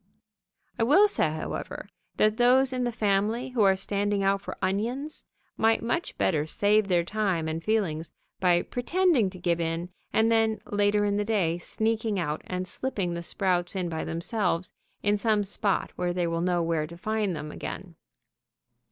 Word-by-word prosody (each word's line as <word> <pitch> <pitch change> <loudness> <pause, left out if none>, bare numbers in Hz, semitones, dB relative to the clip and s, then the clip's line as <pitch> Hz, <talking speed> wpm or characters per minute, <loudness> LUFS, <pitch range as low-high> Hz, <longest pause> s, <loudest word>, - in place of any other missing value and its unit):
I - - +3
will 365 - +6
say, 405 - +2
however, 155 0 -5 0.3
that 215 +1 +3
those 255 +2 +4
in 250 -1 -1
the 240 - 0
family 220 +3 0
who 250 -3 0
are 195 -2 +5
standing 200 +1 -1
out 195 0 +2
for - - -7
onions 235 +11 -2 0.3
might 225 +1 +3
much 335 +9 -2
better 155 -4 +1
save 205 +4 +2
their 175 -3 +2
time 185 -4 -1
and 160 +1 -3
feelings 170 -8 -1 0.3
by 175 -2 +3
pretending 295 - +1
to 185 - -11
give 170 -1 0
in, 165 +1 -2 0.2
and 225 +1 +3
then, 225 -1 +2
later 205 0 +2
in 205 0 +1
the 210 - +1
day, 190 -6 0
sneaking 220 +2 -1
out 155 -4 -2
and 185 0 -3
slipping 195 -4 -2
the 170 - -4
sprouts 175 0 0
in 180 -2 -1
by 160 -1 -3
themselves 180 +1 -1 0.3
in 205 +1 +2
some 210 -1 +2
spot 200 0 -1
where 175 0 -1
they 175 -1 0
will 165 0 -1
know 175 -1 +1
where 165 -2 0
to 170 +2 -11
find 210 -1 -1
them 150 0 -6
again. 180 +2 -7
200 Hz, 175 wpm, -27 LUFS, 175-220 Hz, 0.3 s, will